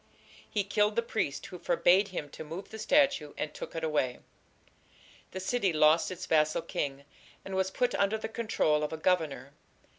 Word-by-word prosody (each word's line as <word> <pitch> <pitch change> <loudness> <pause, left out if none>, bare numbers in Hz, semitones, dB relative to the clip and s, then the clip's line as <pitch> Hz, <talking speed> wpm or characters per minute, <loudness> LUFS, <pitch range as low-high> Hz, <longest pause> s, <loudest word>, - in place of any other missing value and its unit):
"He 205 - 0
killed 210 +1 +1
the 235 - +1
priest 215 -11 -2
who 180 - -9
forbade 190 +5 +3
him 180 -6 -5
to - - -8
move 165 +5 -7
the 220 - -8
statue, 245 - +2
and 150 - -3
took - - -8
it 165 - -3
away." 145 -6 0 1.1
The 185 - -6
city 200 0 0
lost 155 +1 +4
its 185 0 -6
vassal 155 -3 +2
king, 140 -1 -3 0.4
and 195 - -6
was 190 0 +1
put 245 +5 0
under 200 +2 +1
the 220 - -4
control 220 -9 +1
of 150 - -2
a 160 - -4
governor. 155 -6 0
180 Hz, 180 wpm, -30 LUFS, 155-210 Hz, 1.1 s, lost